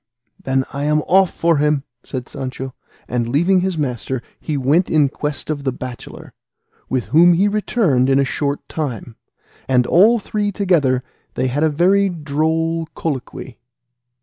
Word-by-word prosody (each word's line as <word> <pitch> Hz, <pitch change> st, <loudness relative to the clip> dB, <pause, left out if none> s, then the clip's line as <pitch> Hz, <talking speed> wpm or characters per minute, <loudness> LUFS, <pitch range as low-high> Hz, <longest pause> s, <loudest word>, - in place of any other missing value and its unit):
"Then 130 Hz, 0 st, 0 dB
I 140 Hz, +1 st, -3 dB
am 150 Hz, 0 st, +2 dB
off 190 Hz, 0 st, +4 dB
for 170 Hz, -2 st, +1 dB
him," 150 Hz, -1 st, +1 dB, 0.2 s
said 130 Hz, -1 st, -6 dB
Sancho; 130 Hz, -1 st, -6 dB, 0.3 s
and 120 Hz, -1 st, -2 dB
leaving 175 Hz, +8 st, +3 dB
his 185 Hz, -2 st, -1 dB
master 130 Hz, -3 st, -3 dB, 0.2 s
he 155 Hz, -3 st, -3 dB
went 145 Hz, +7 st, +2 dB
in 150 Hz, -3 st, +3 dB
quest 150 Hz, +2 st, -4 dB
of 145 Hz, -2 st, -4 dB
the 135 Hz, -, 0 dB
bachelor, 125 Hz, -1 st, -9 dB, 0.6 s
with 130 Hz, -2 st, -1 dB
whom 175 Hz, +3 st, +7 dB
he 190 Hz, +5 st, +3 dB
returned 200 Hz, -, +1 dB
in 135 Hz, -, +4 dB
a 140 Hz, -, +3 dB
short 140 Hz, +1 st, -3 dB
time, 125 Hz, -7 st, -5 dB, 0.5 s
and, 125 Hz, -1 st, +3 dB
all 210 Hz, -, +5 dB
three 205 Hz, -1 st, -2 dB
together, 160 Hz, -, +1 dB, 0.3 s
they -, -, 0 dB
had 140 Hz, +4 st, -1 dB
a 160 Hz, -, +4 dB
very 190 Hz, +6 st, +3 dB
droll 160 Hz, +1 st, -1 dB
colloquy. 130 Hz, -4 st, -5 dB
150 Hz, 155 wpm, -19 LUFS, 130-175 Hz, 0.6 s, whom